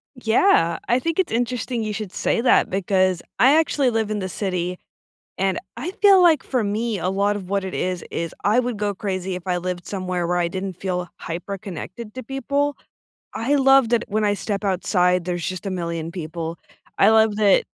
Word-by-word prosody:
Yeah. 220 - +3
I 240 +2 +3
think 330 +5 -2
it's 375 - +1
interesting 245 0 -1
you 215 -1 -3
should 210 -3 -5
say - - 0
that 250 - +4
because 185 -1 +1 0.2
I 265 +4 +6
actually 295 -4 +2
live 225 -2 -1
in 210 - -1
the 190 -1 -3
city, 180 -1 -2 0.6
and 190 0 0 0.2
I 350 - -4
feel 395 -2 +7
like 325 -5 +5
for 250 -4 -1
me, 210 0 -1
a 185 - -1
lot 200 +2 +1
of 190 -2 -7
what 200 -1 0
it 190 - -5
is 180 -1 -2
is 165 -1 -3
I 215 +5 +4
would 245 -3 -2
go 205 0 -1
crazy 190 -2 -3
if 180 +1 -8
I 180 - +1
lived 180 0 -4
somewhere 185 -3 -2
where 175 0 +1
I 175 -1 +1
didn't 190 +1 -4
feel 180 -1 -3
hyperconnected 190 +4 -6
to 255 - -7
people. 280 +3 -1 0.6
I 255 +6 0
love 270 -3 +5
that 235 -1 +1
when 215 0 0
I 205 - +3
step 200 +1 -3
outside, 180 -2 +1
there's 175 -2 -2
just 185 +2 -4
1,000,000 170 -3 -3
people. 165 -1 -5 0.4
I - - +6
love 220 -1 +4
that 205 -3 +5
e - - -41
200 Hz, 200 wpm, -22 LUFS, 180-235 Hz, 0.6 s, feel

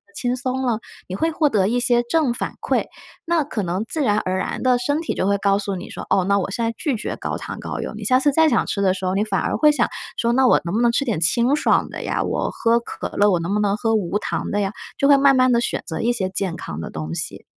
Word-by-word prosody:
轻 245 +2 -1
松 260 0 -2
了， 235 -4 0 0.3
你 185 - -5
会 325 +11 0
获 305 -1 +2
得 195 -5 +2
一 240 +4 +1
些 240 -1 +3
正 255 0 +1
反 - - -3
馈， - - 0 0.4
那 335 -2 +1
可 230 -6 -4
能 185 +5 -2
自 315 - -2
然 210 -6 +2
而 185 0 -2
然 - - -3
地 255 -1 +4
身 285 +5 0
体 325 - -2
就 185 - -1
会 200 0 +2
告 200 0 +2
诉 200 -1 -3
你 180 - -7
说， - - -7
哦， 190 - +3
那 200 +1 +2
我 190 - -3
现 230 +4 -2
在 230 - -1
拒 285 -6 -1
绝 - - -4
高 - - -4
糖 - - -7
高 - - -5
油， - - -4
你 - - -7
下 255 0 +4
次 290 +1 +3
再 320 +2 +4
想 235 - +2
吃 200 - -2
的 190 -1 +3
时 190 0 -5
候， 185 - 0
你 205 - +2
反 200 -3 -1
而 - - -1
会 300 -1 +5
想， 255 -5 +1 0.3
说： 235 0 +1
“那 260 0 +4
我 - - +5
能 170 - -3
不 230 - +1
能 235 - +4
吃 280 +4 0
点 220 - -1
清 235 - +3
爽 295 - +2
的 - - -7
呀？ - - -1
我 - - -1
喝 230 +1 +2
可 235 - -6
乐， 205 +1 +5
我 175 - +2
能 170 +4 -2
不 210 - +1
能 205 0 +1
喝 225 0 0
无 200 -1 0
糖 - - -3
的 205 - 0
呀？ 195 0 -1 0.3
“就 275 - +2
会 285 - +7
慢 275 -1 +5
慢 255 0 +4
地 235 -1 +3
选 - - -2
择 160 - -4
一 240 - +2
些 190 -6 -1
健 185 -2 -2
康 80 - -6
的 - - -6
东 80 +1 -5
西。 - - -4
230 Hz, 315 characters per minute, -21 LUFS, 195-255 Hz, 0.4 s, 会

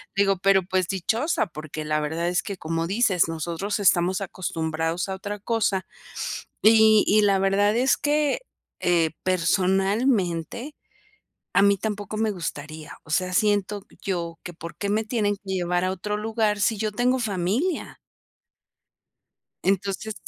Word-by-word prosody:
Digo, 195 -1 +3
pero 195 0 +4
pues, 185 0 0
dichosa, 220 - 0
porque 155 -1 -7
la 150 0 0
verdad 160 +3 -2
es 180 0 0
que 200 -2 -5
como 165 0 -2
dices: 195 -4 +2
"Nosotros 170 +6 -3
estamos 185 -1 +3
acostumbrados 165 -3 -2
a 190 - -3
otra 205 +2 -6
cosa". 205 -3 0 0.8
Y 220 -1 +7
y 215 +1 +4
la 200 -2 +4
verdad 195 +2 +2
es 260 +2 +4
que, 295 -1 +1 0.4
eh, 170 -3 +3
personalmente 190 - +1 0.8
a - - +4
mí 200 0 +5
tampoco 210 0 -4
me 220 0 +1
gustaría, 155 -4 -6
o - - -19
sea, 180 +3 0
siento 205 0 +1 0.2
yo 170 -3 -3
que, 175 - -7
¿por 165 0 -9
qué 200 - -3
me 215 +2 +1
tienen 215 -2 0
que 200 - -24
llevar 180 -1 0
a 185 - +1
otro 205 +3 -3
lugar, 215 -1 0
si 215 +2 +2
yo 215 0 -2
tengo 250 +4 +2
familia? 220 - -1 1.7
Entonces 195 +2 -1
195 Hz, 145 wpm, -24 LUFS, 175-215 Hz, 1.7 s, Y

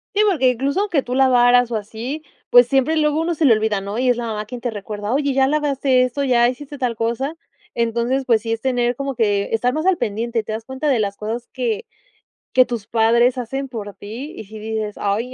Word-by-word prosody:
Sí 420 - +4
porque 270 -9 +3
incluso 275 - 0
aunque 345 -10 0
tú 245 - -5
lavaras 245 -2 +4
o - - -1
así, 230 +8 -5 0.3
pues 245 0 +7
siempre 270 +5 +2
luego 305 +1 +2
uno 335 0 -1
se 305 - +1
le 240 - +7
olvida 215 -2 0
¿no? 200 +3 -5
Y 255 0 +2
es 245 - +3
la 240 - -3
mamá 215 -1 -3
quien 245 +1 -8
te 245 - -2
recuerda 205 +1 -5
oye 280 0 +1
ya 265 0 +3
lavaste 280 -3 +2
esto, 255 +3 -1
ya 240 -2 +4
hiciste 290 +3 -7
tal 245 -3 -1
cosa. 235 +7 -2 0.4
Entonces, 235 +3 0
pues 230 -3 +3
sí, 225 0 -4
es 225 0 -2
tener 245 -2 0
como, 275 +1 -3
que 205 -3 +1
estar 245 +3 +2
más 310 +3 -2
al 380 -2 +3
pendiente, 230 - -1
te 215 - -7
das 220 +1 -5
cuenta 265 +4 -4
de 260 -5 +3
las 200 -1 -2
cosas 225 +3 -4
que 455 -2 -2 0.7
que 255 - +7
tus 235 -5 -5
padres 235 +3 +3
hacen 270 +3 -4
por 210 -5 -7
ti. 235 +9 -8
Y - - -6
si 215 +2 -11
dices, 215 -1 -4
ay, 220 +5 -1
245 Hz, 230 wpm, -20 LUFS, 225-270 Hz, 0.7 s, pues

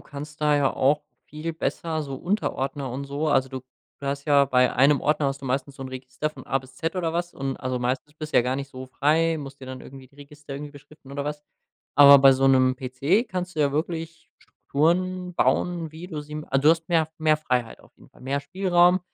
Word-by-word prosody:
kannst 145 +1 -10
da 150 -1 +3
ja 140 -2 +2
auch 145 +3 +2 0.2
viel 155 +3 -5
besser 160 0 -2
so 140 -2 -6
Unterordner 140 - -2
und 135 +3 -5
so 140 +3 -2
also 135 -2 +2
du 130 0 -6 0.4
du 140 - -7
hast 140 0 -3
ja 145 -2 +5
bei 125 -2 +3
einem 140 +3 +4
Ordner 150 -1 +1
hast 135 0 -2
du - - -5
meistens 135 +2 -2
so 135 - -7
'n 130 - -6
Register 130 +3 -4
von 135 -4 -13
A 135 - +1
bis 130 0 -16
Z 165 +5 -3
oder 170 -3 -1
was 175 +1 -3
und 135 -1 -3
also, 130 -1 -2
meistens 130 +4 -2
bist 155 0 -7
ja - - +6
gar 125 +2 -1
nicht 140 0 -6
so 130 0 -8
frei, 160 +5 +1
musst 140 -2 -9
dir 130 - -9
dann 130 0 -8
irgendwie 135 0 -12
die 140 - -27
Register 145 0 -11
irgendwie 145 +1 -7
beschriften 145 -1 -15
oder 140 0 -3
was. 150 0 -4 0.5
Aber 140 -1 +9
bei 135 0 +7
so 135 +1 +2
'nem 130 -1 +4
PC 135 - 0
kannst 180 -3 -5
du 155 - 0
ja 140 -1 +2
wirklich 165 +2 -4
Strukturen 180 +4 -1
bauen, 170 -2 +1
wie 160 +3 -9
du 160 -5 -5
sie 150 0 -11
m 150 0 -5
also 135 0 +2
du 155 - +8
hast 165 0 0
mehr 165 -3 +2
mehr 155 -1 +3
Freiheit 125 -6 -2
auf - - -23
jeden - - -20
Fall, - - -21
mehr 135 +2 -2
Spielraum, 180 +2 +3
145 Hz, 235 wpm, -25 LUFS, 135-160 Hz, 0.5 s, Aber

